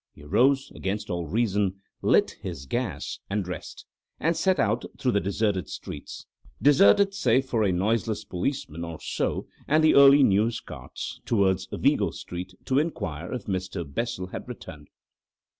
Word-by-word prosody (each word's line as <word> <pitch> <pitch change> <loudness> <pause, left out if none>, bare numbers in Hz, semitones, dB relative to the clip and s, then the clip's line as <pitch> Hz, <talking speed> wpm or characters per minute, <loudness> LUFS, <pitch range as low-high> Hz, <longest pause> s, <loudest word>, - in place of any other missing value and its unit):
He 70 - -14
arose, 135 - +2
against 100 +1 -3
all 85 -2 -2
reason, 100 -1 0 0.2
lit - - +3
his 65 - -6
gas, 100 - -3
and 100 0 0
dressed, 90 -2 -7 0.3
and 165 +1 +1
set 190 +2 +2
out 110 +2 +1
through 130 -3 +1
the 100 - +2
deserted 100 -1 -1
streets—deserted, 145 - +1
save 130 - +2
for 120 -4 0
a 100 - +2
noiseless 105 +3 0
policeman 90 - -3
or 85 -2 -6
so - - -2 0.2
and 155 +2 +3
the 155 - +6
early 140 0 +8
news 110 +2 +3
carts—towards 95 -4 -2
Vigo - - +2
Street 90 +1 -7
to 130 +1 +2
inquire 85 - -3
if 125 -5 -4
Mr. 95 -2 -3
Bessel 115 +7 -3
had - - -7
returned. 80 - -9
105 Hz, 145 wpm, -26 LUFS, 90-130 Hz, 0.3 s, early